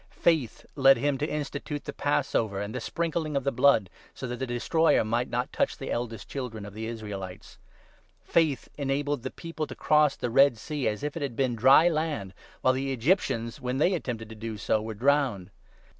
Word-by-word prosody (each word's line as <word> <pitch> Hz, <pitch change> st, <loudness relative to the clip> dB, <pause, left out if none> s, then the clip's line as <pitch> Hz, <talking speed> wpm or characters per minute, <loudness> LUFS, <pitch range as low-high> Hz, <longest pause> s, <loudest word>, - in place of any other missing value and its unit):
Faith 160 Hz, -9 st, +2 dB
led 135 Hz, -2 st, +6 dB
him 140 Hz, +3 st, +1 dB
to 145 Hz, +3 st, -2 dB
institute 145 Hz, 0 st, -4 dB
the -, -, -5 dB
Passover 120 Hz, -8 st, 0 dB
and 105 Hz, +2 st, -4 dB
the 125 Hz, -, -3 dB
28 -, -, -10 dB
Sprinkling 160 Hz, +1 st, -2 dB
of 135 Hz, -, -1 dB
the 140 Hz, -, +1 dB
Blood, 125 Hz, -5 st, +4 dB, 0.3 s
so -, -, -6 dB
that 125 Hz, 0 st, -4 dB
the 130 Hz, -, -3 dB
Destroyer 160 Hz, +7 st, +2 dB
might 120 Hz, +3 st, 0 dB
not 125 Hz, +1 st, -2 dB
touch -, -, 0 dB
the -, -, -5 dB
eldest 115 Hz, -3 st, -4 dB
children 120 Hz, -6 st, -5 dB
of 100 Hz, -, -9 dB
the 110 Hz, +1 st, -5 dB
Israelites. 105 Hz, -5 st, -7 dB, 0.6 s
Faith 155 Hz, -6 st, +1 dB
enabled 145 Hz, +1 st, 0 dB
29 -, -, -20 dB
the -, -, -1 dB
people 165 Hz, -2 st, -4 dB
to -, -, -8 dB
cross 150 Hz, -2 st, +3 dB
the 120 Hz, -, -3 dB
Red 135 Hz, -1 st, +5 dB
Sea, 145 Hz, +4 st, -3 dB
as 105 Hz, +3 st, -2 dB
if 150 Hz, -1 st, -3 dB
it 165 Hz, -, -4 dB
had 135 Hz, -5 st, -3 dB
been 130 Hz, -1 st, +1 dB
dry 130 Hz, +8 st, +6 dB
land, 155 Hz, -, -1 dB, 0.3 s
while 130 Hz, -, +4 dB
the 135 Hz, +1 st, -2 dB
Egyptians, 120 Hz, -, 0 dB
when 125 Hz, +1 st, -2 dB
they 175 Hz, +7 st, +3 dB
attempted 120 Hz, -9 st, -4 dB
to 110 Hz, -, -9 dB
do 110 Hz, 0 st, -6 dB
so, 110 Hz, +1 st, 0 dB
were 110 Hz, 0 st, -5 dB
drowned. 125 Hz, -6 st, +1 dB
130 Hz, 205 wpm, -27 LUFS, 115-145 Hz, 0.6 s, led